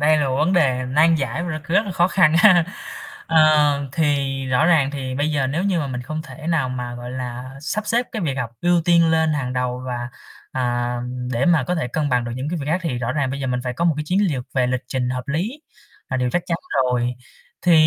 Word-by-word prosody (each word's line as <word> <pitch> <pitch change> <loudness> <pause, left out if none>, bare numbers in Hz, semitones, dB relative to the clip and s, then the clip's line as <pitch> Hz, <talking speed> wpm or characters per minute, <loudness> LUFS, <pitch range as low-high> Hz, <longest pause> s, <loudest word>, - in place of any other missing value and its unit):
đây 155 +1 +4
là 145 -2 +1
một 130 - -1
vấn 155 +6 +2
đề 130 -8 +2
nan 160 +5 +4
giải 150 +1 -2
mà 175 - -3
nó 155 - -3
c 155 - -18
rất 195 +6 +2
là 200 - -5
khó 175 0 +3
khăn 160 -5 +4
ha. 180 -2 +6 0.6
Ờ, 150 -3 +4
thì 140 -4 0
rõ 130 +5 +2
ràng 155 -5 +4
thì 130 -3 -4
bây 145 +3 0
giờ 140 -3 +1
nếu 160 +8 -1
như 190 -4 +1
mà 150 - -1
mình 125 -2 -4
không 155 +5 -5
thể 160 0 -10
nào 160 -6 +1
mà, 125 -1 -4
gọi 120 0 -7
là, 125 0 -5
sắp 210 +8 -3
xếp 235 +3 +1
cái 220 -5 -3
việc 145 -5 -1
học 125 -4 -3
ưu 175 0 +3
tiên 170 -1 +4
lên 160 -1 +2
hàng 135 -4 -2
đầu 125 0 -2
và, 120 -1 -4 0.4
à, 120 -1 -1
ừm, 125 0 -5
để 120 +5 +1
mà 165 -6 +3
có 180 - -1
thể 160 -8 -2
cân 150 +3 -1
bằng 125 -2 +1
được 120 - -4
những 130 +3 -3
cái 175 +1 -2
việc 140 - -5
khác 160 +4 +1
thì 135 -8 -2
rõ 120 0 -2
ràng 140 -2 0
bây 140 +1 -4
giờ 135 - -2
mình 125 -1 -1
phải 125 - -2
có 150 +7 -2
một 165 -3 +3
cái 150 - -2
chiến 180 +5 +1
liều 135 -6 -2
về 130 -2 +2
lịch 125 0 -1
trình 125 -1 -1
hợp 125 +1 -4
lý 200 - -2 0.5
là 130 - 0
điều 125 -1 0
chắc 175 - 0
chắn 170 - 0 0.3
rồi. 125 -1 0 0.5
Thì 180 - +4
140 Hz, 265 wpm, -21 LUFS, 125-165 Hz, 0.6 s, ha